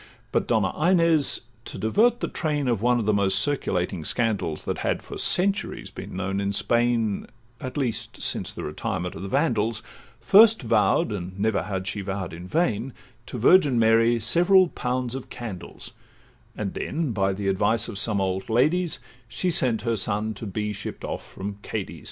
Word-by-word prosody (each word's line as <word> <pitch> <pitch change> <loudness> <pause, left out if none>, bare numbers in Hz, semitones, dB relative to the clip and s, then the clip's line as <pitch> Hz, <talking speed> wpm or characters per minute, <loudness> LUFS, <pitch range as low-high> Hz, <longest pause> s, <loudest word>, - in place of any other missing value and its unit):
But - - 0
Donna - - +1 0.2
Inez, 165 -5 +3 0.2
to - - -7
divert 225 - +2
the - - 0
train 150 -4 -2
Of 115 -5 0
one 125 +1 +3
of 110 - -2
the 105 - +2
most 100 -1 +2
circulating 95 - 0
scandals 105 -7 0
That - - -3
had - - -1
for - - -9
centuries 195 +3 +1
been - - -8
known 95 +1 -2
in 100 0 -1
Spain, 120 -2 +1 0.3
At 130 +4 -6
least 120 -4 -3
since - - -2
the - - -7
retirement 90 +1 -3
of 80 - -8
the 100 - -5
Vandals, 110 +2 0 0.4
First 215 - +6
vow'd 165 - +2
(and 95 -1 -6
never 110 -2 +1
had 95 +1 -4
she 105 0 -3
vow'd 95 -3 -4
in 85 +2 -8
vain) 125 - 0 0.3
To - - -6
Virgin 140 - +5
Mary 115 +1 +4
several 180 - +4
pounds 125 -2 -2
of 135 -1 -7
candles; 110 -7 -7 0.7
And 100 -3 -3
then, 155 -3 -2
by 95 -2 +1
the 100 +1 -3
advice 105 +3 +1
of 100 - -4
some 105 -2 +1
old 95 +1 -2
ladies, 155 +9 +2 0.3
She 130 +11 -1
sent 120 -9 +1
her 115 -1 0
son 105 +2 -1
to 110 +1 -7
be 105 +2 -3
shipp'd 100 - -7
off - - -6
from 100 +1 -6
Cadiz. - - -5
115 Hz, 175 wpm, -25 LUFS, 100-135 Hz, 0.7 s, First